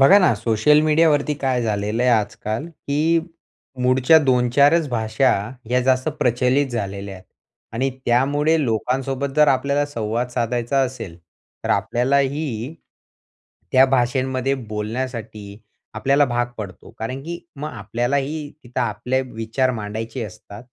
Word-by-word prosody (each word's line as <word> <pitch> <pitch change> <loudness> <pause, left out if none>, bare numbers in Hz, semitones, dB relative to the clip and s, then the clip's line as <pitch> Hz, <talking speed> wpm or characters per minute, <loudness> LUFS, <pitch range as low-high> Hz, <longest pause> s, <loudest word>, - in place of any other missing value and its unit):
बघा 165 +10 +8
ना, 180 - +4
सोशल 115 +7 +3
मीडियावरती 150 -1 +3
काय 130 -3 -1
झालेलं 105 +1 -1
आहे 125 - +4
आजकाल, 110 +3 -1
की 160 +1 0 0.6
मूळच्या 130 +5 +5
2-4 130 +4 +4
च 150 - -6
भाषा, 110 +2 +1 0.3
ह्या 125 +3 +1
जास्त 130 +2 +2
प्रचलित 125 +3 +2
झालेल्या 100 -4 -4
आहेत 95 - -13 0.5
आणि 135 +3 0 0.2
त्यामुळे 145 +6 +2
लोकांसोबत 135 +4 -1
जर 150 -1 +6
आपल्याला 140 +2 +2
संवाद 115 -2 -2
साधायचा 120 +2 -1
असेल, 120 -10 -7 0.5
तर - - -1
आपल्यालाही 135 0 0 1.0
त्या 130 +1 +7
भाषांमध्ये 130 +1 +1
बोलण्यासाठी 110 -2 -5 0.4
आपल्याला 135 +6 +3
भाग 120 -2 0
पडतो. 95 -5 -8
कारण 130 +5 -4
की 170 +2 -5 0.2
मग 150 +2 -4
आपल्यालाही 140 +5 -2
तिथं 120 0 -4
आपले 120 +3 -1
विचार 125 +1 -1
मांडायचे 110 +2 -5
असतात. 100 +2 -11
125 Hz, 125 wpm, -21 LUFS, 115-140 Hz, 1.0 s, बघा